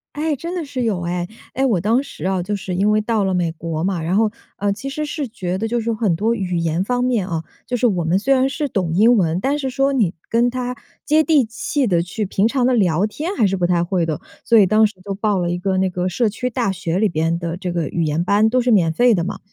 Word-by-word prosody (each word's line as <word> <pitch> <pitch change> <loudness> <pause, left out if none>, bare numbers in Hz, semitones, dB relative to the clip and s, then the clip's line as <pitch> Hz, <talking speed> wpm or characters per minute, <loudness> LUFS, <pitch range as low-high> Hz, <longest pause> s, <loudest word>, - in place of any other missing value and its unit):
哎， 305 0 0
真 335 +7 -5
的 340 -4 -3
是 270 -3 -4
有 210 -6 0
哎。 175 0 -2 0.3
哎， 265 - -1
我 220 -8 +2
当 220 +8 +2
时 185 - -9
哦， 190 -1 0
就 205 +4 -2
是 190 -2 -5
因 195 +4 +2
为 215 0 +3
到 215 -1 0
了 190 -1 0
美 175 -2 0
国 160 -1 -4
嘛， 185 -2 -1
然 170 +4 -1
后， 215 0 +3 0.3
呃， 205 0 0
其 250 +7 -6
实 305 +2 -3
是 295 -2 -4
觉 185 -5 -4
得 220 +3 -2
就 240 +1 0
是 230 0 -1
很 215 -6 +1
多 220 +6 +1
语 185 -6 -2
言 165 +1 0
方 245 +4 0
面 235 -7 0
哦， 165 -2 -3 0.2
就 245 0 -1
是 250 - +1
我 185 -7 +2
们 165 +3 +2
虽 265 +7 +2
然 265 0 +2
是 295 +2 -2
懂 185 -10 -1
英 230 +6 +5
文， 170 -4 +1
但 280 +8 0
是 270 - -2
说 275 +1 +1
你 210 -10 +1 0.2
跟 235 +2 +3
他 250 0 -3 0.3
接 310 +2 +4
地 305 -5 +3
气 255 +5 -2
地 175 -6 +2
去 205 +5 -3
平 195 +2 +1
常 250 +1 +1
地 255 - +3
聊 190 -5 +2
天 315 - -4
还 225 - +3
是 195 0 +1
不 175 -1 +1
太 175 -1 +2
会 175 -1 0
的。 155 -2 -3 0.2
所 230 - +4
以 205 - +7
当 215 +3 +4
时 210 - -13
就 200 0 -4
报 205 0 0
了 175 -1 -1
一 175 - -2
个 190 0 0
那 190 0 +2
个 180 0 -2
社 225 +6 +1
区 250 +4 -3
大 235 -4 -1
学 170 -2 -2
里 215 +2 +3
边 165 +1 0
的 170 -1 -4
这 180 -2 -4
个 170 -4 -1
语 170 - -1
言 155 +2 0
班， 205 +4 +3
都 255 +2 +2
是 245 0 +1
免 175 -6 +4
费 240 +8 +4
的 175 -5 0
嘛。 190 - -4
205 Hz, 300 characters per minute, -20 LUFS, 175-245 Hz, 0.3 s, 以